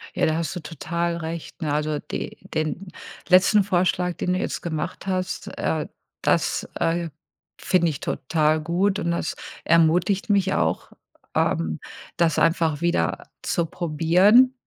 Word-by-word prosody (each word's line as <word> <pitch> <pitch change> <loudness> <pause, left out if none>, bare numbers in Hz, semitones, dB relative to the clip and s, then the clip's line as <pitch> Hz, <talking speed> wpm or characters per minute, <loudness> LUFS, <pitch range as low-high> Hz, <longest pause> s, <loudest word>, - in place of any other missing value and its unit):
Ja, - - +2
da 155 - +1
hast 170 +3 -2
du - - -3
total 170 +1 -3
recht, 165 +2 -6
ne? 150 -2 -1
Also, 150 0 0
die - - -6 0.2
den 155 +5 -2 0.4
letzten 190 +3 +5
Vorschlag, 180 -1 +1
den 180 - -1
du 185 - 0
jetzt - - -3
gemacht 160 +3 -4
hast, 185 -1 -2
äh, 155 -2 -1 0.3
das, - - +1
äh, 170 0 0 0.5
finde 175 -2 +2
ich 150 - -4
total 155 +2 0
gut 190 +5 +1
und 170 -3 -1
das 170 - -2 0.3
ermutigt 170 +5 +3
mich 195 -2 +3
auch, - - -1 0.4
ähm, 80 -1 0 0.4
das 165 -3 +2
einfach 165 -2 +2
wieder 170 - 0
zu 170 - 0
probieren, 180 - +4
170 Hz, 145 wpm, -24 LUFS, 160-185 Hz, 0.5 s, letzten